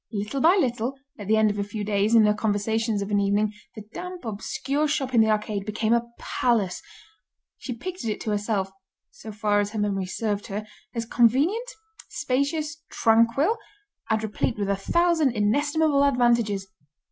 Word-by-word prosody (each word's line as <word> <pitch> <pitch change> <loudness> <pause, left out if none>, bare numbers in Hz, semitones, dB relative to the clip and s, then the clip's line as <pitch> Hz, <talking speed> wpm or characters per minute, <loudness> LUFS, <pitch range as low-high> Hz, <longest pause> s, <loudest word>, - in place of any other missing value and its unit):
Little 215 +5 -3
by 335 +4 +6
little, 245 -2 -1 0.2
at 205 - -7
the 220 +1 +3
end 215 -1 +4
of 205 - -5
a - - +1
few 205 +1 -5
days, 205 +2 +1
in 220 -2 +7
her 210 - +4
conversations 215 0 0
of 200 - -7
an 205 - +3
evening, 205 +1 +1 0.2
the 215 - -8
damp, 360 -1 -7
obscure 270 +7 -2
shop 275 -3 -1
in 230 - +6
the 220 - +3
arcade 210 -1 -1
became 215 +2 0
a 235 0 +1
palace; 205 -8 0 0.8
she 255 - -5
pictured 345 -1 -5
it 210 - -3
to 215 - -2
herself, 205 -2 -1 0.4
so 355 - -10
far 210 -1 +1
as 205 +1 -1
her 215 - -3
memory 195 -2 -1
served 205 +1 -2
her, 205 +2 -4 0.3
as 230 0 -2
convenient, 280 - +2 0.4
spacious, 300 +4 -2
tranquil, 230 - +3 0.5
and 220 0 +1
replete 220 +1 -2
with 200 -1 -2
a - - +2
thousand 320 - +2
inestimable 285 +7 +2
advantages. 235 -7 +2
220 Hz, 170 wpm, -25 LUFS, 205-275 Hz, 0.8 s, in